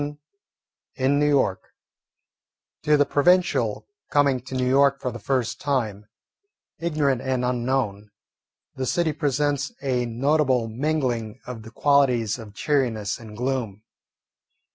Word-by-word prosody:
VII 145 0 -4 0.8
IN 135 +2 +2
NEW 150 - +3
YORK 135 -10 +2 1.2
To 150 0 +3
the 145 - +4
provincial 180 +7 +2 0.2
coming 140 -3 +3
to 130 +1 -8
New 130 -1 0
York 140 +1 +4
for 125 - -3
the 120 - -8
first 125 +2 -1
time, 110 -8 -1 0.7
ignorant 150 -6 0
and 130 -1 -1
unknown, 120 -5 -1 0.6
the 130 -1 -3
city 165 +1 +1
presents 145 -2 0
a 125 -3 0
notable 130 0 +1
mingling 120 -3 -2
of 125 -3 -7
the 110 - -11
qualities 125 -4 +2
of 105 -2 -11
cheeriness 115 -7 0
and 110 -2 -11
gloom. 120 -5 -2
130 Hz, 125 wpm, -24 LUFS, 115-145 Hz, 1.2 s, the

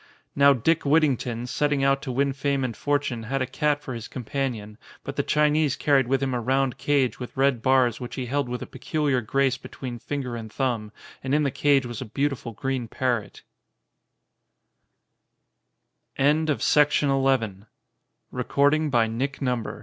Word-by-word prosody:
Now 140 0 +6
Dick 160 +6 +1
Whittington, 135 -6 +1
setting 145 +2 0
out 135 0 +2
to 130 - -4
win 140 +2 +1
fame 140 0 -1
and 120 -3 -3
fortune, 145 -5 -1
had 130 +5 -2
a 130 - 0
cat 145 +3 -1
for 130 - -5
his 115 -1 -6
companion, 120 -4 -4 0.2
but 135 - -6
the 140 - +1
Chinese 150 0 +2
carried 140 -4 +2
with 135 +1 +1
him 130 -1 -1
a 120 - -1
round 130 +1 0
cage 140 -4 +1
with 125 +1 -8
red 135 -3 +2
bars, 130 -2 +3
which 125 -1 -7
he 130 - -3
held 135 +1 -1
with 125 0 -4
a - - -6
peculiar 145 -5 -1
grace 135 +3 +1
between 125 -3 -7
finger 130 -2 -4
and 110 -2 -7
thumb, 120 -6 -2 0.3
and 135 +2 0
in 150 - +2
the 140 - 0
cage 140 0 +2
was 120 -1 -6
a - - -4
beautiful 135 +1 -2
gre 135 +5 -2
135 Hz, 140 wpm, -25 LUFS, 125-140 Hz, 0.3 s, Now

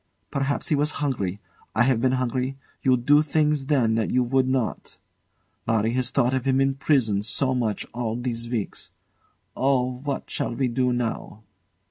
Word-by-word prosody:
Perhaps 140 +1 -1
he 150 - +3
was 145 +1 +1
hungry. 105 -10 -2 0.4
I 115 - +5
have 125 -2 +2
been 130 0 +2
hungry: 130 +1 -1 0.2
you 130 -1 +4
do 145 +5 +4
things 150 -2 +1
then 130 -7 +3
that 110 -1 0
you 125 - +2
would 130 +1 +2
not. 130 -4 -2 0.7
Larry 110 0 +2
has 125 0 0
thought 125 0 +1
of 130 -1 -1
him 135 0 +2
in 135 0 +3
prison 130 -8 +2
so 130 +5 0
much 115 -5 -1
all 115 -1 -2
these 120 -1 -4
weeks. 115 -5 -4 0.7
Oh! 130 -2 +1
what 140 0 -4
shall 120 - -3
we 130 -1 0
do 125 +1 +1
now? 115 -2 -3
130 Hz, 170 wpm, -25 LUFS, 115-135 Hz, 0.7 s, I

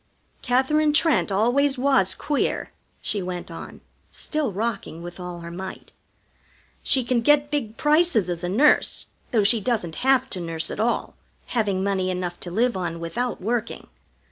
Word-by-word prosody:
"Katherine 295 +5 +2
Trent 315 -7 +2
always 255 +8 +2
was 255 -8 +3
queer," 295 -2 -1 0.3
she 205 - +2
went 180 -1 -5
on, 165 - -9 0.3
still 300 -6 -2
rocking 195 -5 -3
with 175 +1 -9
all 180 -1 -6
her 170 0 -8
might. 190 +2 -8 0.9
"She 260 - +2
can 240 0 +1
get 290 +3 +3
big 235 -7 -2
prices 300 - +3
as 175 -1 -4
a 175 - -1
nurse, 275 +11 +3 0.2
though 225 -5 +2
she 220 +2 +4
doesn't 200 -8 -1
have 265 0 +3
to 185 - -2
nurse 165 -2 -3
at - - -6
all, 235 +2 0 0.4
having 200 -5 +1
money 190 -2 0
enough 180 -1 -3
to 175 - -5
live 235 +6 +1
on 170 -3 -3
without 235 +10 -3
working. 230 +3 -3
220 Hz, 160 wpm, -24 LUFS, 180-265 Hz, 0.9 s, she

